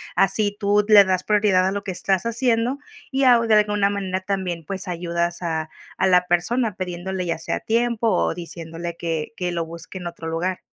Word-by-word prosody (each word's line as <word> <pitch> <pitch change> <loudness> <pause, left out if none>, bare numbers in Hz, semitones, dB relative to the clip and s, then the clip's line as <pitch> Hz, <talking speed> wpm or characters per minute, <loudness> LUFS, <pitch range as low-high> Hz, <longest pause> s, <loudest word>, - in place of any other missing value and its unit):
Así 205 +1 +1
tú 205 0 +3
le 210 -2 +9
das 185 -1 0
prioridad 205 -3 +3
a 190 - 0
lo 200 0 -3
que 190 - -4
estás 190 +1 -1
haciendo 235 +2 0 0.3
y 270 0 +1
au 235 -2 +5
de 220 - +5
alguna 210 -1 +3
manera, 190 -2 -2
también, 185 -4 -3
pues, 195 -1 -5
ayudas 170 0 -2
a 160 -1 -2 0.3
a 190 - +2
la 180 -1 +4
persona 215 +5 +1
pidiéndole 185 0 -4
ya 165 -2 -1
sea - - -2
tiempo, 235 0 0
o 185 - +1
diciéndole 170 0 -6
que 160 -3 -3
que 180 -1 -2
lo 170 -1 -2
busque 165 +3 -9
en 175 - -6
otro 170 -1 -7
lugar. 175 +3 -2
185 Hz, 195 wpm, -22 LUFS, 175-210 Hz, 0.3 s, le